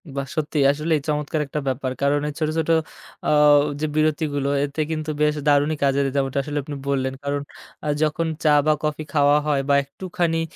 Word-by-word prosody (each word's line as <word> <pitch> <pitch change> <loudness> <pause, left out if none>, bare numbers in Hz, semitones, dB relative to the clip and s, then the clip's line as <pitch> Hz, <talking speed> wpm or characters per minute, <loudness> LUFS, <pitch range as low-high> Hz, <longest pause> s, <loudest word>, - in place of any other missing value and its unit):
বাহ! 140 0 -3
সত্যি 155 0 -2
আসলে 150 +3 -3
এই - - -5
চমৎকার 150 +1 -1
একটা 150 - -3
ব্যাপার 130 0 -1
কারণ 140 +1 +2
এই - - -6
ছোট, 155 - 0
ছোট, 160 0 -1 0.6
আও 150 -1 +6 0.2
যে, 155 - -1
বিরতিগুলো 150 -2 0
এতে 145 +2 -2
কিন্তু 155 -1 -2
বেশ 150 0 +3
দারুণই 145 +1 +3
কাজের 140 0 +2
যেমটা 135 -1 0
আসলে 150 +1 -4
আপনি 145 +1 -6
বললেন। 130 -1 0
কারণ 140 0 -1 0.4
আ - - -2 0.2
যখন 155 +2 0 0.2
চা 150 -2 +5
বা 155 - +4
কফি 155 0 -2
খাওয়া 145 -1 +4
হয় 145 -2 +2
বা 140 - +5
একটুখানি 170 +2 -2
150 Hz, 190 wpm, -22 LUFS, 140-155 Hz, 0.6 s, আও